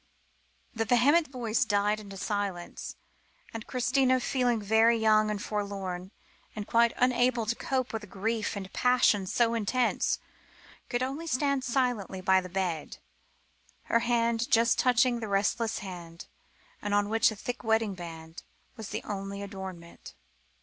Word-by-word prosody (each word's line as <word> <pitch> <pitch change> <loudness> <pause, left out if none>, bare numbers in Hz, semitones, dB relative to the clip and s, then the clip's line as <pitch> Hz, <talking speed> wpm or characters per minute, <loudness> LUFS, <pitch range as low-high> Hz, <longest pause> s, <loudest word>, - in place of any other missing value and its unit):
The 225 - -1
vehement 280 +8 +4
voice 240 -3 0
died 210 -1 +1
into 200 -2 -10
silence, 200 -3 -4 0.6
and 225 -1 -7
Christina, 255 +1 +2
feeling 245 -2 +1
very 220 +3 +4
young 215 -1 +4
and 210 -1 -2
forlorn, 195 -3 -4 0.5
and 210 -1 -4
quite 235 +1 +3
unable 245 -1 +2
to 225 - +1
cope 255 0 -2
with 220 -1 -3
a - - -10
grief 215 +4 -2
and 195 -1 -7
passion 245 -6 +3
so 235 +4 +2
intense, 230 +2 +1 0.7
could 245 0 0
only 280 +6 -4
stand 280 -2 +1
silently 245 -7 -1
by 190 0 +3
the 185 - -8
bed, 180 -4 -3 1.0
her 230 - +6
hand 235 0 +1
just 230 +1 +4
touching 250 -1 +3
the 225 - -4
restless 210 +3 0
hand, 170 -3 -9 0.6
on 205 0 +1
which 225 +1 +3
a 220 - -6
thick 245 +5 -5
wedding 220 -2 +1
ring 165 -2 -9 0.4
was 220 -4 -8
the - - -4
only 200 -1 -5
ornament. 185 -3 -9
220 Hz, 145 wpm, -29 LUFS, 195-245 Hz, 1.0 s, her